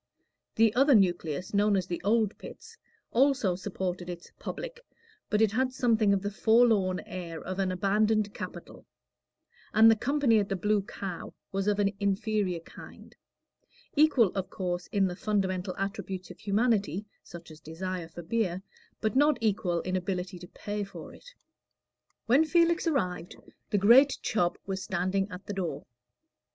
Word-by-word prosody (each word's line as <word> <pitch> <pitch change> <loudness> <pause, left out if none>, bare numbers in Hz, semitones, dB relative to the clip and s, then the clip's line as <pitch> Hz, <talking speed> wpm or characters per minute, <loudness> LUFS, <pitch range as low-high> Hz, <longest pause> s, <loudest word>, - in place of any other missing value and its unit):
The 225 -1 +4
other 270 +2 +5
nucleus, 175 -4 +1
known 205 0 +3
as 185 - -1
the 175 - -4
Old 215 0 +2
Pits, 455 0 -11 0.4
also 255 -7 +2
supported 185 -1 -4
its 175 -1 -8
"public," - - -6 0.5
but 210 0 +3
it 215 - +3
had 255 +4 0
something 225 -5 +2
of 200 -1 +1
the 205 - -2
forlorn 220 -4 +3
air 170 -3 -7
of 185 +1 -6
an 190 -1 +1
abandoned 205 +3 +1
capital; - - -9 0.9
and 225 +1 +8
the - - +4
company 255 -1 +2
at 200 - -2
the 195 - 0
Blue 210 +2 +1
Cow 190 -2 -7 0.2
was 195 +1 -2
of 205 -1 +2
an 200 -1 +1
inferior 200 -3 0
kind - - -13 0.8
equal, 285 - +4
of 190 -1 -3
course, 175 -2 -3
in 200 -2 +1
the 180 -1 -2
fundamental 190 -2 -1
attributes 195 -2 -4
of - - -13
humanity, 210 -2 0 0.2
such 170 -1 -12
as 155 - -13
desire 175 +2 -5
for 170 +1 -10
beer, 190 -1 -1 0.4
but 220 +3 -1
not 295 +1 +4
equal 200 -6 0
in 185 0 -3
ability 180 0 -3
to 175 - -10
pay 205 +3 -5
for 195 - -10
it. - - -16 0.9
When 255 +7 +5
Felix 340 +1 +2
arrived, 180 - -1 0.3
the 205 - +1
great 245 +8 +6
Chubb 175 -5 0
was 195 -1 -3
standing 190 +2 -1
at 180 0 -9
the 205 - -5
door. 170 -7 -4
200 Hz, 160 wpm, -29 LUFS, 185-225 Hz, 0.9 s, and